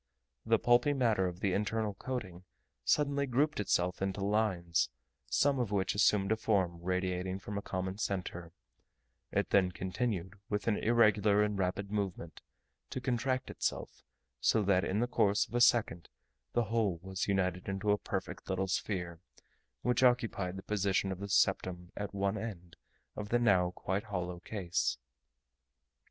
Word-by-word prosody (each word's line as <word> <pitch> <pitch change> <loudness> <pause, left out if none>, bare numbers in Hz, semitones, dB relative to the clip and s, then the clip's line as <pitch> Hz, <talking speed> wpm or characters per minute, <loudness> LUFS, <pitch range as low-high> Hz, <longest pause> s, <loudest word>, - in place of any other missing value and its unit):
The - - +5
pulpy 120 +4 +4
matter 115 -8 +2
of 90 0 -6
the 95 -3 +1
internal 105 +1 0
coating 95 -6 -5 0.4
suddenly 140 -1 +2
grouped 140 +3 +1
itself 90 -3 0
into 95 +1 -1
lines, 100 -5 +1 0.4
some 140 - +2
of 120 -5 -1
which 95 -2 +1
assumed 100 -1 +3
a - - +4
form 95 -6 0
radiating 90 +1 -1
from 100 +1 -7
a 100 - -2
common 95 +1 -4
centre; 90 -4 -3 0.8
it - - 0
then 95 -2 +4
continued, 95 0 -3
with 105 0 -2
an 110 - +3
irregular 105 -3 +4
and 105 0 0
rapid 95 +2 -1
movement, 95 -5 -3 0.5
to - - -4
contract 130 0 -1
itself, - - -3 0.4
so 105 - +3
that 95 -1 +3
in 100 +4 0
the 120 - +1
course 105 -4 +2
of - - -17
a 120 - +1
second 105 -9 +3 0.4
the 120 - +2
whole 110 -6 0
was 95 -1 -3
united 90 -2 0
into 95 +2 0
a 105 - +2
perfect 95 0 -5
little 95 0 0
sphere, 90 -3 -2 0.6
which 125 +1 +2
occupied 115 -7 +2
the 95 - -8
position 100 -2 0
of 95 - -5
the 100 0 -5
septum 90 -2 +1
at 100 -1 -4
one 100 +1 -1
end 90 -6 -7 0.4
of 105 0 -5
the 120 - +3
now 100 -7 +3
quite 95 +3 -3
hollow 90 -4 -4
case. 90 - -1
100 Hz, 155 wpm, -32 LUFS, 90-110 Hz, 0.8 s, The